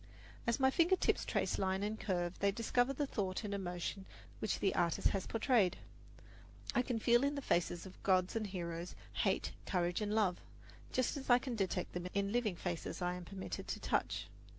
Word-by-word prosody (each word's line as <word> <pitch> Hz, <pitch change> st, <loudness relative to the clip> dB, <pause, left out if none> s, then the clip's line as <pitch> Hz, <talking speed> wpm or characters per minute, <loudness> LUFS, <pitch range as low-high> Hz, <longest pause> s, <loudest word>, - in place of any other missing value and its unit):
As 235 Hz, -, +2 dB
my 265 Hz, 0 st, +5 dB
finger 345 Hz, +5 st, +4 dB
tips -, -, +1 dB
trace -, -, 0 dB
line 190 Hz, 0 st, +1 dB
and 215 Hz, +1 st, -2 dB
curve, 175 Hz, -3 st, -1 dB
they 200 Hz, 0 st, +3 dB
discover 245 Hz, +4 st, +2 dB
the 285 Hz, +2 st, -1 dB
thought 195 Hz, -6 st, -2 dB
and 205 Hz, -1 st, -3 dB
emotion 190 Hz, 0 st, -3 dB, 0.3 s
which 215 Hz, -, 0 dB
the 195 Hz, -, +1 dB
artist 170 Hz, -2 st, +2 dB
has 195 Hz, -, -2 dB
portrayed. 225 Hz, -5 st, +3 dB, 1.0 s
I 245 Hz, -, +4 dB
can 250 Hz, -2 st, -1 dB
feel 240 Hz, +3 st, +4 dB
in 285 Hz, +1 st, +1 dB
the 280 Hz, -, -2 dB
faces 175 Hz, -2 st, +1 dB
of 190 Hz, -, -12 dB
gods 185 Hz, 0 st, +3 dB
and 220 Hz, -2 st, 0 dB
heroes 170 Hz, -2 st, -4 dB, 0.2 s
hate, -, -, +1 dB, 0.2 s
courage 175 Hz, 0 st, +1 dB
and 210 Hz, 0 st, 0 dB
love, 195 Hz, -5 st, +2 dB, 0.5 s
just 255 Hz, +3 st, +1 dB
as 270 Hz, -, -7 dB
I 245 Hz, -, +8 dB
can 250 Hz, -1 st, -3 dB
detect 190 Hz, -3 st, -1 dB
them 180 Hz, 0 st, -3 dB
in 200 Hz, 0 st, +1 dB
living 225 Hz, -5 st, +1 dB
faces 170 Hz, -1 st, -3 dB
I 180 Hz, -1 st, 0 dB
am 180 Hz, -1 st, -6 dB
permitted 190 Hz, +1 st, -5 dB
to -, -, -3 dB
touch. -, -, 0 dB
200 Hz, 195 wpm, -36 LUFS, 180-240 Hz, 1.0 s, I